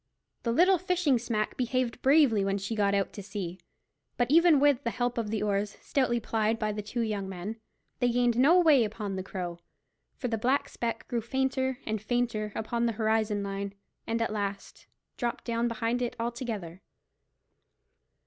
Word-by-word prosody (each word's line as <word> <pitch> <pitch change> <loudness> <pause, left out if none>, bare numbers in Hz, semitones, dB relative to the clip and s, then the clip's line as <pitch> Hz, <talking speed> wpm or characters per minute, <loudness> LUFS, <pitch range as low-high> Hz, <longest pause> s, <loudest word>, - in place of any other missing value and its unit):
The 235 - -1
little 360 +8 +5
fishing 355 -8 +2
smack 220 -3 -2
behaved 250 -1 -1
bravely 265 -7 +5
when 195 0 0
she 195 +3 -4
got 200 -2 +2
out 200 -1 0
to 205 - -7
sea; 190 -3 -5 0.6
but 245 +1 +1
even 335 -2 +6
with 285 -1 +3
the 235 - 0
help 245 +1 -1
of 220 -2 -2
the 215 -1 -1
oars, 205 0 -1
stoutly 250 -4 +1
plied 220 0 0
by 215 -1 -1
the 210 0 -4
two 215 +4 -3
young 205 -4 -2
men, 190 +4 -5 0.4
they 245 - +3
gained 245 -1 +2
no 290 +9 +6
way 305 -8 +6
upon 210 -2 -4
the 190 - -2
Crow, 175 -2 -5 0.6
for 250 - -3
the 225 -2 -1
black 275 +4 +1
speck 230 -1 -4
grew 235 -1 -1
fainter 265 +2 -1
and 215 -1 -2
fainter 225 -2 -1
upon 235 +2 -1
the 230 - 0
horizon 215 -1 +1
line, 200 0 -4 0.3
and 230 0 0
at 225 - -2
last 200 -1 -5 0.3
dropped 240 -2 -2
down 235 0 0
behind 230 +1 -1
it 245 - -2
altogether. 230 -7 -4
230 Hz, 175 wpm, -29 LUFS, 210-245 Hz, 0.6 s, even